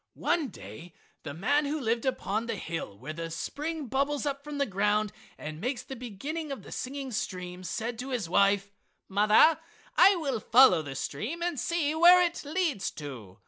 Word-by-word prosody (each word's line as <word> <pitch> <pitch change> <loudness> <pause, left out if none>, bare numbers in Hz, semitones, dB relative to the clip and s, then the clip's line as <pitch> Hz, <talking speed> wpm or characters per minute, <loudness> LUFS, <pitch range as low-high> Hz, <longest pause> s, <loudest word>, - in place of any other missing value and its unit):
One 340 -4 0
day 125 - -11 0.3
the 145 -2 -7
man 285 - +2
who 300 +2 -2
lived 235 -1 -1
upon 225 -3 -1
the 230 - -2
hill 165 - -5
where 135 +8 -7
the 165 +1 -5
spring 300 - -4
bubbles 280 +4 -1
up 280 -1 -3
from 295 0 -6
the 280 - +2
ground 210 0 +1 0.3
and 155 +1 -7
makes 250 +2 -2
the 265 - -8
beginning 280 +7 -5
of 275 - -6
the - - -12
singing 270 0 -5
stream 180 -4 -4
said 225 +6 -4
to 255 +2 -5
his 240 -9 -2
wife: 200 +2 +2 0.4
"Mother, 210 +10 +5 0.4
I 395 - +7
will 280 -9 -2
follow 245 -6 +6
the 145 -3 -7
stream 230 - -4
and 345 -6 -1
see 325 -3 0
where 345 +3 +8
it 345 -1 0
leads 295 - -1
to!" 125 -11 -8
235 Hz, 185 wpm, -29 LUFS, 185-290 Hz, 0.4 s, where